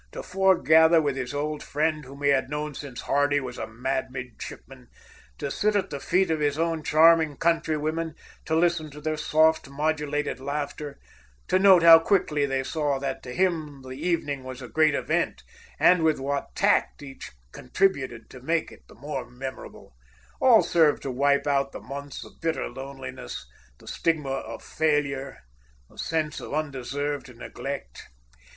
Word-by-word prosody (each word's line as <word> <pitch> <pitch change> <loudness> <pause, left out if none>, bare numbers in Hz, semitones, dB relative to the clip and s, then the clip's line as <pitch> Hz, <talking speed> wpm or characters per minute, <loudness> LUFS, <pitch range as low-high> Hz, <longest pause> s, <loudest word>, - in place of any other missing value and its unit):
To - - -6
foregather 170 -4 +5
with 145 -4 0
his 130 -2 -4
old 150 +1 -3
friend 155 0 -1
whom 140 +2 -11
he 140 - +4
had 135 -2 +2
known 150 0 -3
since 135 -3 -7
Hardy 145 0 +2
was 125 -3 -7
a - - -4
mad 130 +4 -2
midshipman, 130 0 -9 0.5
to 140 - -4
sit 210 0 +1
at 200 - 0
the 140 - -4
feet 185 +4 +1
of 160 - 0
his 145 -1 0
own 165 -1 0
charming 160 -1 +4
countrywomen, 165 -1 0 0.3
to 160 - 0
listen 165 -2 +1
to 150 +1 -11
their 155 +1 -2
soft, 155 0 +2
modulated 150 0 -1
laughter, 145 +1 -4 0.5
to 185 - +3
note 190 -3 +7
how 165 -1 +10
quickly 160 -5 +1
they 135 -1 -1
saw 145 -1 -1
that 135 -1 -4
to 125 - -8
him 155 -4 -1
the 130 - -10
evening 145 -2 -2
was 130 -1 -8
a 125 - -8
great 155 +5 +3
event, - - -1 0.3
and 180 - +5
with 160 -2 +2
what 140 +1 -3
tact - - +2
each 135 -1 -9 0.2
contributed 130 - -1
to 130 - -11
make 165 +4 -1
it - - -15
the - - -16
more 135 +1 -6
memorable; 130 - -9 0.4
all 245 -4 +6
served 160 -4 +3
to 135 - -3
wipe 140 +2 +2
out 140 -1 +1
the - - -6
months 140 +1 -8
of - - -17
bitter 165 -1 -1
loneliness, 130 - -8 0.3
the - - -18
stigma 155 -5 -1
of 115 -4 -5
failure, 140 -3 -1 0.5
the - - -20
sense 155 -2 -1
of - - -6
undeserved 145 -2 -3
neglect. 140 +3 -6
145 Hz, 165 wpm, -26 LUFS, 135-160 Hz, 0.5 s, how